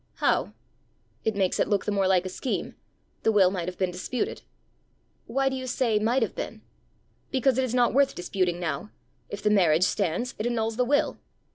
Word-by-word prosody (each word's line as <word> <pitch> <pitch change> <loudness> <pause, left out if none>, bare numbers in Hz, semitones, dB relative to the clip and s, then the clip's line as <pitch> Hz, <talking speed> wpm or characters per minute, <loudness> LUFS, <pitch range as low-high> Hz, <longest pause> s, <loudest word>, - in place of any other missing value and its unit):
"How?" - - +1 0.7
"It 220 - 0
makes 190 -2 +1
it - - +2
look 205 -2 0
the - - 0
more 195 -2 +2
like 185 -1 +3
a - - -3
scheme: 245 +7 -3 0.5
the 225 - +3
will 195 -4 +5
might 180 -3 -3
have 180 - -5
been 185 -2 0
disputed." 185 +7 -3 0.9
"Why 270 +4 +1
do 265 - 0
you 260 0 -5
say 240 -4 +1
might 235 +5 +2
have - - -3
been?" - - -6 0.7
"Because 265 -1 +2
it - - +2
is 250 -1 -2
not 245 -1 +3
worth 275 +1 +3
disputing 175 -1 -1
now. 175 +4 -3 0.4
If 205 0 -7
the 210 - +3
marriage 175 -5 +4
stands, 195 +5 0
it 220 - 0
annuls 225 -2 -1
the 250 +1 +1
will." 285 +3 +1
210 Hz, 200 wpm, -26 LUFS, 185-250 Hz, 0.9 s, will